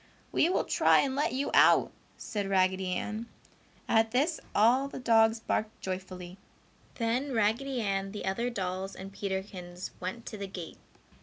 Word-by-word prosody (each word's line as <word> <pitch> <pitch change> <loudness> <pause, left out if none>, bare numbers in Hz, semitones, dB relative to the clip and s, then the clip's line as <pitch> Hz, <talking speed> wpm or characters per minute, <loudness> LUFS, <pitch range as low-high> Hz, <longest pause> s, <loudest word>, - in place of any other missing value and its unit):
"We 330 - +3
will 370 - +1
try - - +4
and 265 -2 -1
let 295 +2 +1
you 270 +2 -1
out," - - +6 0.3
said 205 -3 -3
Raggedy 190 0 +2
Ann. 220 +4 -4 0.6
At 225 0 +3
this 290 +8 +1 0.2
all 245 +6 +4
the - - -8
dogs 225 -2 +4
barked 220 -1 -2
joyfully. 185 -1 -6 0.6
Then 250 +4 -1
Raggedy 235 +4 +1
Ann, 195 -2 -1
the 210 - -6
other 230 +6 0
dolls 190 -3 -3
and 195 +1 -9
Peterkins 190 -3 -5
went 190 +6 -5
to 215 - -7
the 200 - -4
gate. 180 -4 -8
210 Hz, 155 wpm, -30 LUFS, 190-235 Hz, 0.6 s, out